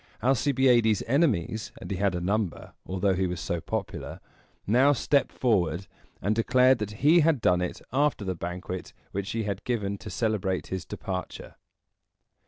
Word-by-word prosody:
Alcibiades' 125 Hz, -4 st, +3 dB
enemies 115 Hz, -, +1 dB
and -, -, -8 dB
he 95 Hz, -, -1 dB
had 100 Hz, -1 st, +1 dB
a -, -, -1 dB
number, 100 Hz, 0 st, -2 dB
although 95 Hz, +1 st, +1 dB
he 95 Hz, 0 st, 0 dB
was 90 Hz, -1 st, -4 dB
so 85 Hz, +1 st, -2 dB
popular -, -, -4 dB, 0.5 s
now 130 Hz, +7 st, +4 dB
stepped 140 Hz, +2 st, +1 dB
forward, 95 Hz, -7 st, +1 dB, 0.4 s
and 100 Hz, +4 st, +2 dB
declared 125 Hz, +2 st, +4 dB
that 105 Hz, +4 st, -5 dB
he 165 Hz, +4 st, +7 dB
had 160 Hz, -3 st, +3 dB
done 90 Hz, -4 st, +3 dB
it 90 Hz, -, -4 dB
after 140 Hz, -6 st, +1 dB
the 95 Hz, -, -1 dB
banquet 90 Hz, +1 st, -6 dB, 0.2 s
which 100 Hz, 0 st, -3 dB
he 115 Hz, 0 st, -1 dB
had 100 Hz, 0 st, -3 dB
given 100 Hz, -5 st, -2 dB
to -, -, -8 dB
celebrate 105 Hz, -5 st, -1 dB
his 95 Hz, -2 st, -4 dB
departure. 95 Hz, -1 st, -6 dB
105 Hz, 160 wpm, -27 LUFS, 95-125 Hz, 0.5 s, he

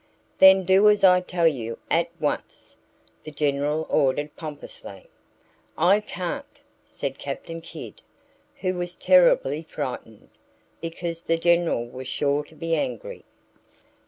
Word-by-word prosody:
"Then 190 Hz, 0 st, +8 dB
do 190 Hz, +3 st, +5 dB
as 210 Hz, -1 st, +2 dB
I 180 Hz, -1 st, +6 dB
tell 180 Hz, -2 st, -1 dB
you, 115 Hz, -7 st, -2 dB
at 170 Hz, +1 st, +2 dB
once!" 150 Hz, -2 st, -4 dB, 0.5 s
the -, -, -8 dB
General 150 Hz, +1 st, -1 dB
ordered 145 Hz, +1 st, 0 dB
pompously. 145 Hz, -, -10 dB, 0.7 s
"I 185 Hz, +6 st, +4 dB
can't!" 180 Hz, -4 st, -6 dB, 0.2 s
said 135 Hz, -1 st, -6 dB
Captain 165 Hz, +4 st, -6 dB
Kidd, 170 Hz, -, -10 dB, 0.6 s
who 185 Hz, -1 st, 0 dB
was 175 Hz, -1 st, -5 dB
terribly 170 Hz, -5 st, +4 dB
frightened, 130 Hz, -8 st, -7 dB, 0.5 s
because 165 Hz, 0 st, -5 dB
the 165 Hz, -1 st, 0 dB
General 170 Hz, -7 st, +2 dB
was 130 Hz, +1 st, -9 dB
sure 145 Hz, +2 st, 0 dB
to 155 Hz, -, -19 dB
be 165 Hz, +1 st, -3 dB
angry. -, -, -4 dB
165 Hz, 125 wpm, -24 LUFS, 145-180 Hz, 0.7 s, Then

